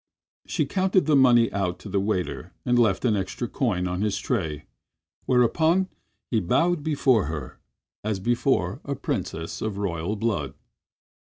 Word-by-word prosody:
She - - 0
counted 185 -2 +2
the 155 -1 +3
money 120 -4 +5
out 95 -3 -1
to - - -9
the 100 0 0
waiter 90 -10 -2
and 120 0 +3
left 110 -1 +2
an 110 -3 +3
extra 100 +5 -3
coin 100 -9 -1
on 90 +1 -2
his 105 -1 0
tray, 80 - -2 0.6
whereupon 160 +10 +3 0.4
he 115 - +3
bowed 165 - +2
before 140 - +2
her 75 -5 -6 0.4
as 105 -2 -1
before 120 +4 0
a - - -3
princess 80 0 -4
of 110 -2 -3
royal 95 0 -2
blood. 100 -10 -2
110 Hz, 150 wpm, -25 LUFS, 90-125 Hz, 0.6 s, money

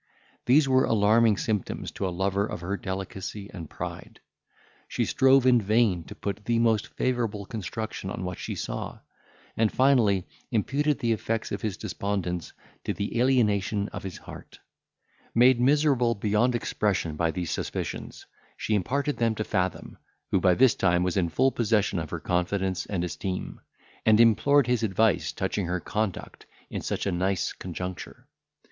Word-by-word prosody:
These 135 +3 +5
were 130 0 +4
alarming 110 0 +4
symptoms 105 -3 -2
to 95 - -3
a - - -1
lover 95 +3 0
of - - -6
her 95 +3 -2
delicacy 95 +1 -6
and 85 -5 -8
pride. - - -7 0.7
She - - -1
strove 135 0 +4
in 125 -2 +5
vain 105 -5 +2
to - - -10
put 100 +1 -5
the 120 -1 +1
most 115 -2 +2
favourable 115 -5 -2
construction 110 -1 -5
on 95 - -5
what 90 -1 -5
she - - -4
saw; - - -5 0.5
and, 110 -1 +2
finally, 120 -9 +3 0.2
imputed 140 +7 +1
the 115 - 0
effects 115 0 -2
of - - -3
his 105 -4 -3
despondence 90 -4 -3 0.3
to - - -2
the 100 +3 -2
alienation 105 -5 +2
of - - -7
his 95 -2 -6
heart. - - -12 0.8
Made 120 +1 +5
miserable 135 -3 +3
beyond 105 +4 +1
expression 100 -8 -1
by 85 +1 +1
these 85 0 -3
suspicions, - - -4 0.3
she 110 - -2
imparted 140 - 0
them 115 -2 +1
to 110 - -2
Fathom, 95 -3 -2 0.3
who, - - +3
by 90 -2 +4
this 130 -2 +5
time, 90 -2 +2
was 90 -1 -1
in 90 -3 +1
full 130 +12 +2
possession 105 -6 +1
of 80 -2 -5
her - - -4
confidence 90 -1 -1
and 95 -4 -2
esteem, 90 +2 -4 0.4
and 110 0 +5
implored 125 +5 +5
his 125 -1 +1
advice 110 -2 +2
touching 100 -4 -2
her 90 +1 -1
conduct 105 +1 -4 0.2
in - - -3
such - - -3
a 100 - 0
nice 95 +1 0
conjuncture. 90 0 -7
105 Hz, 160 wpm, -27 LUFS, 95-120 Hz, 0.8 s, These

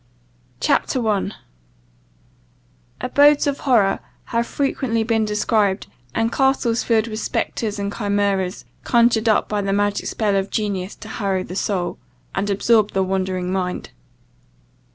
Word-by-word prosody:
CHAPTER 260 - +1
1 210 -4 0 1.7
ABODES 285 +3 +4
OF 285 -1 -1
HORROR 230 -8 +3 0.3
have 235 0 +1
frequently 260 -5 0
been 225 -1 +1
described, 210 -1 +1 0.3
and 225 0 +1
castles, 265 -4 +2
filled 225 -1 +2
with 215 -1 -4
spectres 215 -2 -2
and 200 0 -3
chimeras, 200 -3 0 0.2
conjured 235 -2 +3
up 215 - +3
by 210 -1 -1
the 195 0 -1
magic 205 0 0
spell 210 -3 0
of 195 0 0
genius 200 -3 -2
to 215 - -11
harrow 195 -4 -1
the 180 - -8
soul, 190 -3 -2 0.3
and 200 +1 -1
absorb 210 +1 +3
the 190 - +2
wondering 185 -1 -1
mind. 180 -1 -3
210 Hz, 130 wpm, -21 LUFS, 195-230 Hz, 1.7 s, ABODES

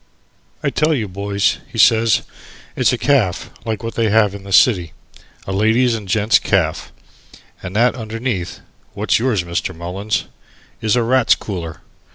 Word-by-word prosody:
"I 140 - 0
tell 155 +2 +1
you, 110 -6 -2
boys," 100 +1 -1
he - - -9
says, 115 -1 +4 0.5
"it's - - +2
a - - 0
caff 120 -11 +1
like 110 -1 -3
what 115 - -4
they 115 -2 0
have 105 -2 +3
in 100 - -8
the 100 - -10
city 95 -4 +4 0.5
a - - -5
ladies' 110 +5 +2
and 110 -3 -5
gent's 105 +2 +3
caff, - - -1 0.7
and 90 +2 -7
that 120 +3 +3
underneath 115 -4 -4 0.3
(what's - - +1
yours, 115 -7 0
Mr. 85 -1 -3
Mullins?) 95 +6 -3 0.6
is 110 0 +1
a 120 - +2
Rats' 130 +1 +3
Cooler. 85 -6 -7
110 Hz, 160 wpm, -18 LUFS, 95-115 Hz, 0.7 s, says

